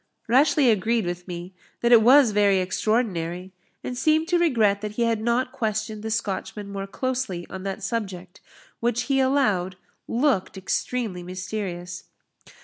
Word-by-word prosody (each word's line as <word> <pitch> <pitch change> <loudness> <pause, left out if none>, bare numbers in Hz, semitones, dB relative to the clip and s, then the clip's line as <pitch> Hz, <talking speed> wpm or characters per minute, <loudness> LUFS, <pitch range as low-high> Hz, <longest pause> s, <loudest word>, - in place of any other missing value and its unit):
Rashleigh 265 +1 +4
agreed 220 +2 +1
with 175 +1 -5
me, 175 +1 -7 0.3
that 235 - +2
it 235 -2 +8
was 255 +1 +6
very 205 -1 +3
extraordinary, 185 -2 -1 0.3
and 250 - -4
seemed 310 +5 +2
to 350 -1 +3
regret 220 -12 +2
that 210 -1 -5
he 235 - 0
had 230 -2 +1
not 240 +3 0
questioned 215 -4 -3
the 220 - -4
Scotchman 210 -1 -3
more 195 0 -5
closely 245 -6 -3
on 190 - -6
that 195 +2 -4
subject, 190 -4 -4 0.4
which 240 0 0
he 275 -1 +1
allowed 215 -10 +1 0.3
looked 240 -7 0
extremely 190 0 -2
mysterious. 180 -1 -5
215 Hz, 145 wpm, -24 LUFS, 185-245 Hz, 0.4 s, it